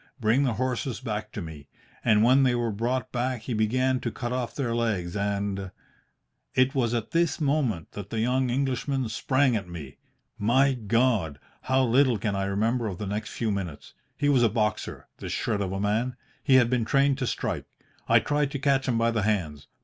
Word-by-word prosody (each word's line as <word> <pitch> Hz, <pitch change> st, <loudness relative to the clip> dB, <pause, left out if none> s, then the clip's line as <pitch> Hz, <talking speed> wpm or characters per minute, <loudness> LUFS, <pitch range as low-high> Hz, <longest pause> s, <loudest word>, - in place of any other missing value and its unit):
Bring 120 Hz, +5 st, +3 dB
the 125 Hz, -, +1 dB
horses 130 Hz, 0 st, -2 dB
back 105 Hz, -4 st, -4 dB
to 105 Hz, -, -4 dB
me. 75 Hz, -4 st, -10 dB, 0.4 s
And 105 Hz, -1 st, +4 dB
when 130 Hz, +4 st, +5 dB
they 125 Hz, -2 st, +3 dB
were 120 Hz, -1 st, 0 dB
brought 120 Hz, +4 st, -2 dB
back 125 Hz, -1 st, -1 dB
he 120 Hz, +2 st, -4 dB
began 130 Hz, +4 st, +1 dB
to 120 Hz, -, -2 dB
cut 120 Hz, +2 st, -4 dB
off 125 Hz, -2 st, -3 dB
their 125 Hz, -5 st, -1 dB
legs 105 Hz, -7 st, -1 dB
and 100 Hz, -1 st, -2 dB, 0.4 s
' -, -, -44 dB
"It 130 Hz, +1 st, +3 dB
was 120 Hz, -3 st, +1 dB
at 115 Hz, -2 st, -3 dB
this 170 Hz, -1 st, +1 dB
moment 135 Hz, -, 0 dB
that 100 Hz, -1 st, -8 dB
the 110 Hz, -, -2 dB
young 125 Hz, +3 st, +1 dB
Englishman 130 Hz, 0 st, -1 dB
sprang 130 Hz, +3 st, +2 dB
at 100 Hz, -5 st, -3 dB
me. 75 Hz, -6 st, -9 dB, 0.4 s
My 130 Hz, +6 st, +3 dB
God! 115 Hz, -, +1 dB, 0.2 s
how 130 Hz, 0 st, +2 dB
little 125 Hz, 0 st, +3 dB
can 105 Hz, 0 st, -2 dB
I 95 Hz, 0 st, -1 dB
remember 110 Hz, +4 st, 0 dB
of 95 Hz, -4 st, -4 dB
the 105 Hz, -, -4 dB
next 105 Hz, +2 st, -3 dB
few 115 Hz, -2 st, -2 dB
minutes! 90 Hz, -7 st, -5 dB, 0.2 s
He 145 Hz, -, +1 dB
was 140 Hz, -4 st, +4 dB
a 115 Hz, -, +5 dB
boxer, 105 Hz, -1 st, -2 dB
this -, -, -4 dB
shred 100 Hz, -, -1 dB
of 95 Hz, -2 st, -2 dB
a 95 Hz, -, -3 dB
man. 110 Hz, +5 st, 0 dB, 0.3 s
He 135 Hz, -, +4 dB
had 125 Hz, -3 st, +6 dB
been 125 Hz, -2 st, +2 dB
trained 140 Hz, +3 st, +2 dB
to 130 Hz, -, -1 dB
strike. -, -, -2 dB, 0.4 s
I -, -, +7 dB
tried 145 Hz, -1 st, 0 dB
to -, -, -1 dB
catch 135 Hz, -1 st, +1 dB
him 120 Hz, -3 st, +1 dB
by 115 Hz, 0 st, +2 dB
the 110 Hz, -1 st, 0 dB
hands. 85 Hz, -9 st, -1 dB
115 Hz, 205 wpm, -26 LUFS, 105-130 Hz, 0.4 s, I